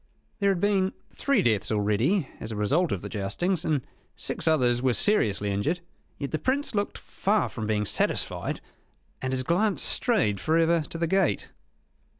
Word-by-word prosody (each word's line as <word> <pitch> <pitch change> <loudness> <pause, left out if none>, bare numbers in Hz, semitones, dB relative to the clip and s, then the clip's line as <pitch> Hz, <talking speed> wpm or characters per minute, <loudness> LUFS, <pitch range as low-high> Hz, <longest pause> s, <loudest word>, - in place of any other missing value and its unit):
There 200 -1 +3
had 190 -3 +1
been 195 -1 +2 0.2
three 280 0 +1
deaths 110 -4 +1
already 110 - +1
as 110 - -6
a - - -4
result 145 - +1
of 95 - -2
the - - -4
joustings; 115 - -1
and 145 -5 0 0.3
six - - -2
others 125 -6 +3
were 130 -2 +2
seriously 105 - +2
injured; 140 - 0 0.4
yet 140 - -4
the 155 - -1
Prince 270 - 0
looked 205 -1 -1
far 205 +1 0
from 110 -3 -5
being 105 -1 0
satisfied, - - 0 0.6
and 130 - -2
his 130 -1 -1
glance 185 +7 +1
strayed 160 - +2
for 160 +1 +1
ever 165 0 +3
to - - -5
the 170 - 0
gate. 190 0 +1
155 Hz, 170 wpm, -26 LUFS, -, 0.6 s, There